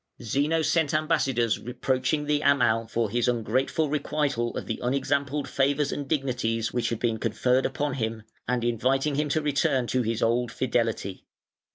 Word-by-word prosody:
Zeno 145 +8 +1
sent 155 -2 +1
ambassadors 135 -7 +1
reproaching 130 +4 -1
the 145 0 +1
Amal 120 -6 +3
for 115 -2 -1
his 120 +1 +1
ungrateful 125 +6 0
requital 140 -5 -1
of - - -4
the 110 - -4
unexampled 140 +3 0
favours 140 +1 +1
and 145 -1 -4
dignities 125 -6 -1
which 120 -1 0
had 115 - -2
been 115 -1 -1
conferred 130 +4 +1
upon 145 +1 -2
him, 110 -3 -3 0.2
and 125 0 0
inviting 130 +5 +1
him 150 +1 0
to 155 +2 0
return 135 -3 +1
to 125 +2 0
his 115 -1 -1
old 120 +1 +1
fidelity. 115 -7 -1
130 Hz, 160 wpm, -26 LUFS, 115-145 Hz, 0.2 s, Amal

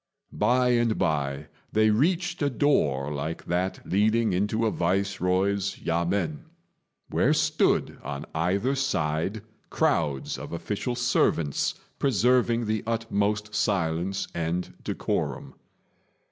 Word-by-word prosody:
By 125 +4 +2
and 120 -2 +2
by 70 -2 -1 0.3
they 110 0 +4
reached 170 - +1
a 145 - +2
door 75 - +1
like 75 +3 -4
that 90 +2 -2
leading 110 +2 +2
into 105 +5 +1
a 110 - +2
Viceroy's 95 +2 0
yamên, 85 -1 -1 0.7
where - - +3
stood - - +1
on 70 +2 -5
either 95 +11 +1
side 100 - -1 0.3
crowds 70 -3 0
of - - -7
official 105 +8 -3
servants, 120 - +1 0.2
preserving 120 -1 +2
the 110 0 -1
utmost 105 -2 -1
silence 95 -2 0
and 85 +2 -2
decorum. - - -2
100 Hz, 105 wpm, -26 LUFS, 85-115 Hz, 0.7 s, they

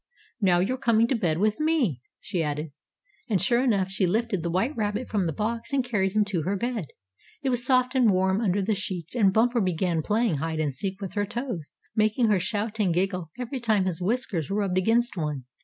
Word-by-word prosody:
"Now 185 -3 +4
you're 255 +8 -1
coming 230 -3 +3
to 265 - +2
bed 175 -9 0
with 210 +3 +1
me," 295 - +1 0.2
she 175 - -2
added. 150 0 -3 0.6
And 200 -4 +2
sure 235 +7 +2
enough, 200 -7 +1
she 195 -1 +1
lifted 215 -1 0
the 170 - -2
white 195 - 0
rabbit 210 +2 -2
from 195 -5 0
the - - 0
box 230 - -3
and 270 -2 +2
carried 195 -6 0
him 210 -1 +3
to 195 -5 -1
her 195 +6 -1
bed. 235 - -2 0.6
It 270 - +1
was 245 -1 +1
soft 255 0 +3
and 255 -4 +4
warm 190 +2 +2
under 200 -2 +1
the 215 +3 +1
sheets, 185 -5 -4
and 210 -6 +4
Bumper 235 +3 +2
began 175 -2 0
playing 210 -1 +1
hide 160 +2 -2
and 150 -3 0
seek 190 +7 -4
with 195 - -5
her 205 -1 -1
toes, 230 - -5 0.2
making 215 +2 +2
her 205 -3 +3
shout 215 +2 -2
and 195 -4 +2
giggle 180 -1 -1
every 250 +2 -4
time 215 -5 +2
his 185 -2 -2
whiskers 200 - -1
rubbed 195 -2 0
against 230 +5 +2
one. 150 -5 -3
205 Hz, 215 wpm, -26 LUFS, 180-235 Hz, 0.6 s, Now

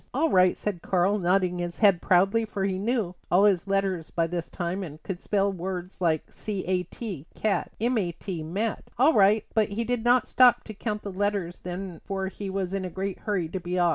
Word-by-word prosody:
"All 320 +4 +2
right," 185 -1 +4
said 200 -5 -3
Karl, 190 +3 +2
nodding 180 0 +1
his 175 -1 -4
head 200 -5 +4
proudly, 195 +5 +3
for 210 -3 -3
he 190 -1 -1
knew 215 -4 0 0.2
all 185 +3 +5
his 195 -2 +2
letters 195 -4 0
by 165 - 0
this 170 0 -4
time 180 +2 -3
and 155 -5 -7
could 185 -2 -5
spell 200 -1 +1
hard 190 - -9
words 180 +1 -5
like 160 -3 +2
c 205 -3 -5
a 185 0 +1
t, 180 - -7
cat, 215 -2 0
m 235 +1 +1
a 175 -4 -1
t, 175 0 -6
mat. 200 +8 -2
"All 280 +7 +5
right," 210 0 +4
but 220 -2 +2
he 210 +3 -2
did 240 0 -1
not 245 +1 +4
stop 250 -1 +5
to 215 - -8
count 210 0 -4
the 200 - -5
letters 195 -2 -1
then 180 -1 -6
for 190 -1 -3
he 195 0 -6
was 190 -1 -2
in 195 -1 -1
a 185 - -3
great 190 +2 -4
hurry 195 -6 -1
to 190 - -3
be 180 +1 -3
off. 175 -1 +4
195 Hz, 230 wpm, -26 LUFS, 180-210 Hz, 0.2 s, all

